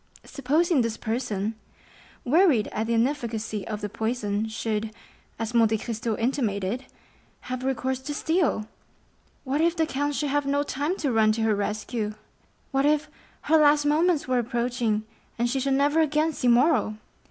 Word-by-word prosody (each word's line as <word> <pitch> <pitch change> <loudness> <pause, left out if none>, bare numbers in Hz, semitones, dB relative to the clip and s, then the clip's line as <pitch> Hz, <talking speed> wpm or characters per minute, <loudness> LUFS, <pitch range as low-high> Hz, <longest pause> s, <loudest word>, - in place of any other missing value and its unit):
Supposing 300 +3 +1
this 230 -1 -2
person, 220 -3 -2 0.7
wearied 295 - +4
at 220 +1 -3
the 235 - +1
inefficacy 225 -4 -1
of 215 -1 -4
the 205 - -2
poison, 220 -1 -2
should, 220 0 -2 0.5
as 225 +1 -4
Monte 225 -2 +4
Cristo 225 0 -3
intimated, 230 -2 -1 0.6
have 255 0 -5
recourse 260 -1 -1
to 290 +2 -5
steel!—What 290 - -3
if 335 +1 +2
the 325 -1 +2
count 290 -1 -2
should 290 -1 -1
have 290 -1 0
no 285 +1 +1
time 290 +6 -2
to 280 - -1
run 220 -2 +4
to 225 0 -1
her 220 -1 +3
rescue!—What 215 +5 -4
if 300 0 +1 0.3
her 320 +2 +3
last 295 -1 +4
moments 315 +1 +2
were 255 -1 +2
approaching, 235 -2 -1 0.3
and 240 +1 +1
she 265 +3 -1
should 270 +1 +1
never 290 +3 +2
again 310 +1 +1
see 250 - -1
Morrel! 245 -2 +3
250 Hz, 155 wpm, -26 LUFS, 220-290 Hz, 0.7 s, wearied